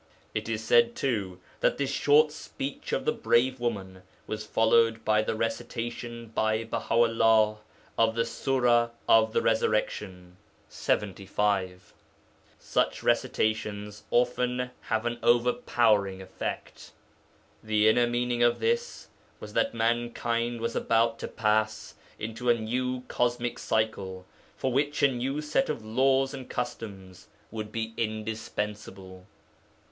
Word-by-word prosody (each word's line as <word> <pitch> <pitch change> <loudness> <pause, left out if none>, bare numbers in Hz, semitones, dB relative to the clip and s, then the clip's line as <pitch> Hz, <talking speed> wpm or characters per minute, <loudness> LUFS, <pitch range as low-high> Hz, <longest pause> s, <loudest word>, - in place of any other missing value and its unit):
It - - -3
is 110 -1 -2
said, 120 +1 +4
too, 100 -9 -2 0.2
that - - +2
this 140 -1 -1
short 150 +2 +4
speech 140 -2 -6
of - - -1
the - - +3
brave 130 +2 +2
woman 95 -6 -3 0.2
was 110 0 -5
followed 115 0 +3
by 110 0 +3
the 110 - -2
recitation 115 0 -4
by 110 0 0
Baha 115 0 -3
'ullah 115 -2 +4 0.4
of 115 0 +3
the 115 0 +1
Sura 120 -3 +2 0.2
of 110 0 +5
the - - +1
Resurrection 100 -5 -1 0.3
(lxxv.). 95 -1 -1 0.8
Such - - -1
recitations 105 -1 -1
often 125 +1 +1
have 110 0 -1
an 120 0 -2
overpowering 115 -5 +2
effect. 95 0 -6 0.7
The 110 0 +2
inner 120 +2 +4
meaning 120 0 -1
of 120 0 +4
this 470 +1 -1 0.3
was - - -9
that 275 -1 +1
mankind 120 0 -1
was 115 0 -2
about 115 0 +2
to - - -4
pass 110 0 0 0.2
into 115 +3 -3
a 120 - +6
new 125 +3 -2
cosmic 120 0 -1
cycle, 100 -4 -2 0.3
for 130 - -1
which 145 +2 0
a 140 - +6
new 135 +4 -2
set 150 - 0
of 110 - -3
laws 135 +4 +2
and 130 -2 -8
customs 100 -6 -6 0.2
would 110 -1 -5
be 115 0 -3
indispensable. 105 -4 -5
115 Hz, 125 wpm, -28 LUFS, 110-120 Hz, 0.8 s, a